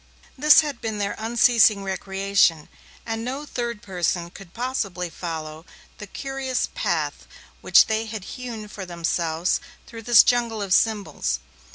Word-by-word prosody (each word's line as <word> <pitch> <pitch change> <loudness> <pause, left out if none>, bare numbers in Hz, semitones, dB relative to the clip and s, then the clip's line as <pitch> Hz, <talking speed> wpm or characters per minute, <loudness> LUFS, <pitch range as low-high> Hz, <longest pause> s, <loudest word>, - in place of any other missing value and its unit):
This 300 +3 +7
had 290 -5 -5
been 220 -2 -3
their 200 -1 -2
unceasing 225 -2 +4
recreation, 195 -4 +1 0.4
and 225 0 -3
no 270 +5 -4
third 235 -5 -4
person 175 -2 -2
could 190 -2 -13
possibly 200 -8 -3
follow 160 -2 -6 0.4
the 210 - -8
curious 270 +3 -3
path - - -2 0.3
which - - +6
they 220 +1 -1
had 220 -3 -6
hewn 230 -2 -7
for 205 -1 -8
themselves 170 -1 -1 0.3
through 230 -1 -10
this 230 0 +7
jungle 235 -2 +1
of 195 -3 -1
symbols. 215 -1 +1
215 Hz, 140 wpm, -23 LUFS, 185-240 Hz, 0.4 s, This